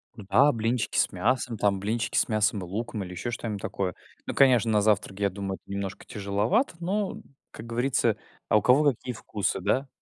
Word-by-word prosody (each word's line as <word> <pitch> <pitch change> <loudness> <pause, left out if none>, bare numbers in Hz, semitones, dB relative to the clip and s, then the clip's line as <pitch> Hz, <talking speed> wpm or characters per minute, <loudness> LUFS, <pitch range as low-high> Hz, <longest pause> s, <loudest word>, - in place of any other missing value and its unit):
Да, 110 +7 +4
блинчики 115 0 0
с - - +2
мясом, 125 -3 0
там 100 -2 +1
блинчики 110 +3 -1
с - - +3
мясом 110 -1 +2
и - - -5
луком, 105 +3 -4
или 90 - -8
еще 105 +7 -4
что-нибудь 110 -4 -4
такое. 95 -3 -3 0.3
Ну - - -3
конечно, 125 -5 +5
на 105 - +3
завтрак 100 -2 +1
я 100 -1 +2
думаю 95 0 -4
это 100 - -15
немножко 100 -1 -4
тяжеловато, 105 - 0
но, 195 +4 -1
м, - - -11 0.3
как 110 - -10
говорится 120 -1 +1 0.3
а - - +4
у 105 - +3
кого 145 +3 +5
какие 125 0 -6
вкусы, 105 -2 -2
да? 130 +9 0
110 Hz, 200 wpm, -27 LUFS, 100-125 Hz, 0.3 s, конечно